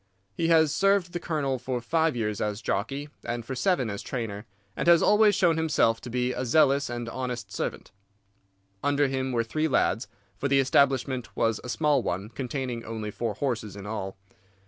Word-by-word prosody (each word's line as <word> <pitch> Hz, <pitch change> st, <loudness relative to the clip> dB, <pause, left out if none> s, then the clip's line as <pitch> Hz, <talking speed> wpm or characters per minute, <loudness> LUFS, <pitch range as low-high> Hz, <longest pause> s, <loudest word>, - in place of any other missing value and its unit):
He 165 Hz, -, -1 dB
has 160 Hz, -3 st, +4 dB
served 195 Hz, -3 st, +2 dB
the 175 Hz, -, -2 dB
Colonel 140 Hz, -6 st, -1 dB
for 125 Hz, 0 st, -2 dB
five 160 Hz, +5 st, +1 dB
years 105 Hz, -3 st, -2 dB
as 105 Hz, +1 st, -2 dB
jockey 135 Hz, +9 st, -2 dB
and 120 Hz, -1 st, -4 dB
for 135 Hz, -, -4 dB
seven 130 Hz, 0 st, +1 dB
as 100 Hz, -2 st, -4 dB
trainer, 115 Hz, -4 st, -5 dB, 0.3 s
and -, -, -2 dB
has 170 Hz, -1 st, +6 dB
always 210 Hz, 0 st, +5 dB
shown 170 Hz, -4 st, +3 dB
himself 150 Hz, -8 st, +2 dB
to 125 Hz, -, -8 dB
be 125 Hz, +1 st, 0 dB
a -, -, -3 dB
zealous 140 Hz, +1 st, +3 dB
and 120 Hz, -1 st, -4 dB
honest 120 Hz, -4 st, -4 dB
servant. -, -, -4 dB, 0.9 s
Under 145 Hz, 0 st, +2 dB
him 130 Hz, 0 st, -2 dB
were 115 Hz, -2 st, +1 dB
three 155 Hz, +7 st, -1 dB
lads; 130 Hz, -4 st, +1 dB, 0.3 s
for 140 Hz, -, 0 dB
the 140 Hz, 0 st, +3 dB
establishment 130 Hz, -2 st, +1 dB
was 115 Hz, -2 st, +1 dB
a 125 Hz, -, -7 dB
small 150 Hz, 0 st, +2 dB
one, 100 Hz, 0 st, -3 dB
containing 125 Hz, -1 st, -4 dB
only 110 Hz, -2 st, -5 dB
four 115 Hz, -1 st, -3 dB
horses 115 Hz, -6 st, -2 dB
in 100 Hz, -1 st, -8 dB
all. 95 Hz, -3 st, -5 dB
130 Hz, 185 wpm, -27 LUFS, 115-145 Hz, 0.9 s, has